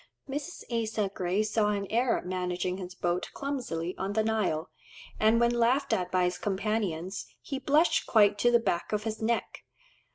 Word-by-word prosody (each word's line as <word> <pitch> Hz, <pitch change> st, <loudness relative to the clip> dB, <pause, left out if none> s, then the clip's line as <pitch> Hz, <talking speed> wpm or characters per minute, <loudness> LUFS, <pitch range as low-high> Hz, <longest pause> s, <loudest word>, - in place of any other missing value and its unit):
Mrs. 290 Hz, +5 st, -5 dB
Asa 220 Hz, -3 st, -1 dB
Gray 185 Hz, +3 st, 0 dB
saw 215 Hz, 0 st, +1 dB
an 200 Hz, -1 st, -1 dB
Arab 235 Hz, -3 st, +1 dB
managing 180 Hz, 0 st, -2 dB
his 185 Hz, -1 st, -7 dB
boat 175 Hz, 0 st, -1 dB
clumsily 235 Hz, -, -3 dB
on 195 Hz, +1 st, -2 dB
the 220 Hz, +1 st, +2 dB
Nile, 210 Hz, -7 st, 0 dB, 0.5 s
and 220 Hz, +2 st, +4 dB
when 235 Hz, 0 st, +4 dB
laughed 240 Hz, +4 st, +2 dB
at 180 Hz, -1 st, -1 dB
by 185 Hz, -1 st, +2 dB
his 180 Hz, 0 st, 0 dB
companions, 195 Hz, -3 st, -2 dB
"he 275 Hz, -, -5 dB
blushed 295 Hz, +5 st, +3 dB
quite 205 Hz, -2 st, +4 dB
to 240 Hz, -, +4 dB
the 240 Hz, -, +6 dB
back 175 Hz, -6 st, -1 dB
of 210 Hz, 0 st, 0 dB
his 220 Hz, 0 st, -4 dB
neck." 230 Hz, +1 st, -1 dB
215 Hz, 170 wpm, -29 LUFS, 185-235 Hz, 0.5 s, the